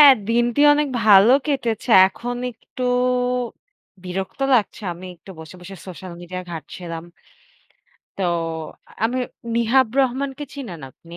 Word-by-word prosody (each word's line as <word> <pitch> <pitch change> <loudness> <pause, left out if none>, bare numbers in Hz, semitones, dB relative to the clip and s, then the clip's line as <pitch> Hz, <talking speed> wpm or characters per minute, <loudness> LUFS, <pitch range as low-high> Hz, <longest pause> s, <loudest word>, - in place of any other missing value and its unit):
হ্যাঁ, 285 -2 +11 0.2
দিনটি 240 +3 +2
অনেক 295 -1 +1 0.2
ভালো 210 +3 +7
কেটেছে, 245 -5 -1 0.2
এখন 245 +5 -5 0.2
একটু 240 +3 -10 1.2
বিরক্ত 190 +8 -5
লাগছে 220 -2 0
আমি 180 +2 -10
একটু 190 - -15
বসে, 160 +2 -10
বসে 190 +2 -10
সোশ্যাল 185 0 -8
মিডিয়া 180 +1 -6
ঘাটছিলাম 165 +1 -7 1.1
তো 195 - -1 0.8
আমি 240 +3 0 0.4
নিহাব 235 +3 +3
রহমানকে 270 +2 0
চিনেন 235 - -7
আপনি? 170 +6 -14
220 Hz, 120 wpm, -21 LUFS, 180-255 Hz, 1.2 s, হ্যাঁ